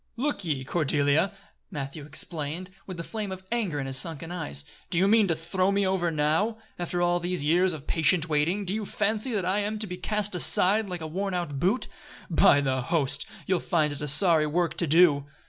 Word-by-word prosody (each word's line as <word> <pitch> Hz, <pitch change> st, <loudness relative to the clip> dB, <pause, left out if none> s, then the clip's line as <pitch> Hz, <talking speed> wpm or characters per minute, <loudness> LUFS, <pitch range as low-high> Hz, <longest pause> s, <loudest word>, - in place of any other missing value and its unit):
"Look 285 Hz, -2 st, -2 dB
ye, 145 Hz, -6 st, -2 dB
Cordelia!" 150 Hz, +4 st, +1 dB, 0.4 s
Matthew 140 Hz, +1 st, -6 dB
exclaimed, 155 Hz, +3 st, -4 dB, 0.2 s
with 185 Hz, -2 st, -7 dB
the 170 Hz, -, -4 dB
flame 210 Hz, +1 st, -5 dB
of 190 Hz, 0 st, -7 dB
anger 205 Hz, -11 st, -1 dB
in 135 Hz, -, -3 dB
his 135 Hz, -1 st, 0 dB
sunken 165 Hz, +3 st, 0 dB
eyes, 70 Hz, -, -4 dB, 0.3 s
"do -, -, -2 dB
you 190 Hz, +3 st, +4 dB
mean 215 Hz, 0 st, +4 dB
to 165 Hz, -, +1 dB
throw 185 Hz, +4 st, 0 dB
me 200 Hz, 0 st, +1 dB
over 185 Hz, -2 st, 0 dB
now? 160 Hz, +9 st, 0 dB, 0.2 s
After 175 Hz, 0 st, -1 dB
all 175 Hz, 0 st, +2 dB
these 175 Hz, -2 st, -2 dB
years 175 Hz, +5 st, +3 dB
of 155 Hz, -3 st, -7 dB
patient 165 Hz, 0 st, +3 dB
waiting, 165 Hz, +6 st, 0 dB
do 185 Hz, -, -2 dB
you 215 Hz, 0 st, -2 dB
fancy 215 Hz, +4 st, -1 dB
that 200 Hz, -4 st, -1 dB
I 190 Hz, +3 st, +1 dB
am 210 Hz, +1 st, -2 dB
to 215 Hz, -, -2 dB
be 180 Hz, -3 st, -6 dB
cast 210 Hz, +2 st, 0 dB
aside, 195 Hz, +3 st, +3 dB
like 180 Hz, -2 st, -5 dB
a -, -, -5 dB
worn 190 Hz, +4 st, -3 dB
out 150 Hz, -6 st, -3 dB
boot? 200 Hz, -, 0 dB, 0.4 s
By 145 Hz, -3 st, +5 dB
the 130 Hz, -2 st, 0 dB
Host! 140 Hz, +1 st, 0 dB, 0.2 s
you'll 185 Hz, -2 st, +1 dB
find 160 Hz, -5 st, 0 dB
it 145 Hz, -, -8 dB
a 150 Hz, -, -3 dB
sorry 155 Hz, +1 st, +4 dB
work 170 Hz, +3 st, 0 dB
to 170 Hz, -, +2 dB
do." 150 Hz, -3 st, +4 dB
175 Hz, 215 wpm, -26 LUFS, 150-195 Hz, 0.4 s, By